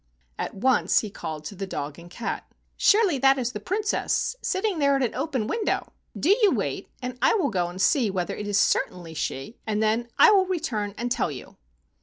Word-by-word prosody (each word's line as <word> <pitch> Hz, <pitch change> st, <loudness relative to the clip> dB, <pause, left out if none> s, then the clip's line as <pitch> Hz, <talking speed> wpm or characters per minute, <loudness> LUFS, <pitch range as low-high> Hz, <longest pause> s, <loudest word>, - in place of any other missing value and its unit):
At -, -, -3 dB
once 250 Hz, +6 st, +3 dB
he 215 Hz, -, -6 dB
called 155 Hz, -5 st, -6 dB
to 200 Hz, -, -6 dB
the 195 Hz, +1 st, -5 dB
dog 145 Hz, -3 st, -5 dB
and 170 Hz, +1 st, -12 dB
cat, 225 Hz, +6 st, -5 dB, 0.2 s
" -, -, -44 dB
Surely 400 Hz, -9 st, +4 dB
that 270 Hz, +1 st, +5 dB
is 245 Hz, -2 st, -1 dB
the 210 Hz, -, -5 dB
Princess 415 Hz, -, -1 dB
sitting 380 Hz, -2 st, -1 dB
there 280 Hz, -1 st, +3 dB
at 270 Hz, -, +1 dB
an 240 Hz, -, -1 dB
open 265 Hz, -4 st, -2 dB
window. 430 Hz, -, -2 dB, 0.3 s
Do 385 Hz, +6 st, +4 dB
you 420 Hz, -, +6 dB
wait -, -, -2 dB
and 250 Hz, 0 st, -5 dB
I 265 Hz, -, +4 dB
will 380 Hz, -, +1 dB
go 180 Hz, -4 st, 0 dB
and 175 Hz, +1 st, -8 dB
see 215 Hz, +4 st, +3 dB
whether 185 Hz, -2 st, -2 dB
it 210 Hz, -, -5 dB
is 205 Hz, -1 st, +1 dB
certainly 170 Hz, -3 st, 0 dB
she, 150 Hz, -, -4 dB
and 215 Hz, 0 st, 0 dB
then 225 Hz, +2 st, +1 dB
I -, -, +8 dB
will 385 Hz, -2 st, +4 dB
re¬ 370 Hz, -2 st, -1 dB
turn 210 Hz, -10 st, -3 dB
and 240 Hz, +1 st, -3 dB
tell -, -, +1 dB
you." 135 Hz, -4 st, -9 dB
235 Hz, 220 wpm, -25 LUFS, 195-305 Hz, 0.3 s, I